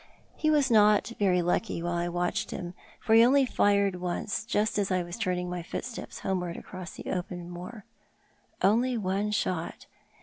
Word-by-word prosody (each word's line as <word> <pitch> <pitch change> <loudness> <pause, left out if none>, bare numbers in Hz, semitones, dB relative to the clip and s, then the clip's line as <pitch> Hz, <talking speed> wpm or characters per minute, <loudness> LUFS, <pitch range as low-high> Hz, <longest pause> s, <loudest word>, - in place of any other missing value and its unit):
He 310 - 0
was 290 -4 +3
not 210 0 +5
very 180 -3 +3
lucky 175 0 -1
while 175 0 -1
I 175 0 -1
watched 175 0 -1
him, 175 -1 -5 0.3
for 225 - +1
he 225 +1 +8
only 270 +3 +5
fired 200 -5 +2
once, 180 +4 -2
just 215 -2 0
as 200 - 0
I 185 -1 +1
was 175 0 -7
turning 180 -5 -1
my 180 0 -4
footsteps 235 +7 -6
homeward 180 -3 -2
across 185 -3 -8
the - - -6
open 175 -1 -4
moor. 185 +5 -8 0.8
Only 235 +5 +3
one 200 0 -1
shot 185 -5 -2
190 Hz, 170 wpm, -28 LUFS, 175-220 Hz, 0.8 s, he